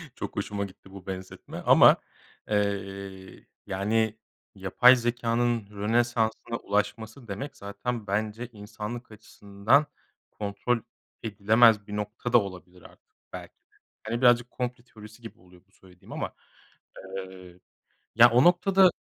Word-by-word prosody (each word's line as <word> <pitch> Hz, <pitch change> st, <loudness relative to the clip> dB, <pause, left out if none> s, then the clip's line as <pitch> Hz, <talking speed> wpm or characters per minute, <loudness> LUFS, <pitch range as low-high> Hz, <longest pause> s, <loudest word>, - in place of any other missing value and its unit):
çok -, -, -6 dB
hoşuma 100 Hz, 0 st, -3 dB
gitti 95 Hz, 0 st, -15 dB
bu 95 Hz, -1 st, -12 dB
benzetme 95 Hz, -1 st, -8 dB
ama, -, -, +7 dB, 0.5 s
eee, 100 Hz, -2 st, -3 dB, 0.2 s
yani, 110 Hz, +3 st, 0 dB, 0.4 s
yapay 100 Hz, +7 st, +5 dB
zekânın 120 Hz, -2 st, 0 dB
Rönesans'ına 115 Hz, +2 st, 0 dB
ulaşması 110 Hz, +4 st, -3 dB
demek 135 Hz, +8 st, -6 dB
zaten 105 Hz, +3 st, -5 dB
bence 110 Hz, +4 st, -2 dB
insanlık 110 Hz, +3 st, -8 dB
açısından 105 Hz, +5 st, 0 dB, 0.5 s
kontrol 105 Hz, +4 st, -2 dB, 0.4 s
edilemez 110 Hz, 0 st, +4 dB
bir 105 Hz, -, -6 dB
nokta 105 Hz, +4 st, -4 dB
da -, -, +9 dB
olabilir 90 Hz, -2 st, -10 dB
artık, -, -, -19 dB, 0.2 s
belki -, -, -8 dB
de. -, -, -39 dB, 0.3 s
Hani, 115 Hz, +2 st, -3 dB
birazcık 120 Hz, -1 st, +4 dB
komplo 125 Hz, -1 st, -4 dB
teorisi 110 Hz, -1 st, -15 dB
gibi 115 Hz, -, -11 dB
oluyor 90 Hz, 0 st, -20 dB
bu -, -, -36 dB
söylediğim 90 Hz, -2 st, -19 dB
ama, -, -, -4 dB, 0.9 s
eee. 95 Hz, -1 st, -10 dB, 0.6 s
Ya, 120 Hz, +2 st, +8 dB
o 125 Hz, +2 st, +5 dB
noktada 185 Hz, +1 st, +5 dB
105 Hz, 125 wpm, -27 LUFS, 100-120 Hz, 0.9 s, da